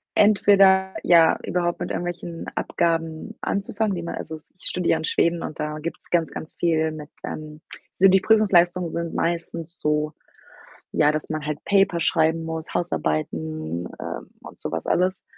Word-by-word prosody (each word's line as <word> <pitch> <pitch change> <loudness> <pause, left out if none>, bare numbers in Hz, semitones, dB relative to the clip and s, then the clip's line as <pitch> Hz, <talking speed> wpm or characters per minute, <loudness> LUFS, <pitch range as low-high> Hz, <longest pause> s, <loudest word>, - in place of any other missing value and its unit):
entweder, 195 -2 +5
ja, 165 -2 +6
überhaupt 175 -1 -1
mit - - -2
irgendwelchen 175 -1 -4
Abgaben 165 -1 -1
anzufangen, 200 +1 -1
die 170 - -4
man 170 - -4
also 160 - -6
s 155 - -15
ich - - -16
studiere 180 -1 0
ja - - +2
in 160 - -5
Schweden 170 +1 +1
und 155 - -6
da 150 0 -3
gibt's 165 +2 -7
ganz, 170 -2 +2
ganz 155 - -8
viel 160 -2 +1
mit, 150 -1 -8 0.2
ähm 155 0 -7 0.4
so, 195 - +6
die 190 0 +5
Prüfungsleistungen 180 -5 +4
sind 170 -1 -3
meistens 170 0 -3
so, 150 0 0 0.8
ja, 150 -1 +4
dass 155 0 -3
man 155 -1 -3
halt 150 -1 -3
Paper 195 -3 +3
schreiben 160 0 +2
muss, 160 0 -5
Hausarbeiten, 80 - -2
ähm, - - -6
und - - -12
so - - -4
was 80 - -3
alles. 185 +1 +1
165 Hz, 170 wpm, -24 LUFS, 155-180 Hz, 0.8 s, ja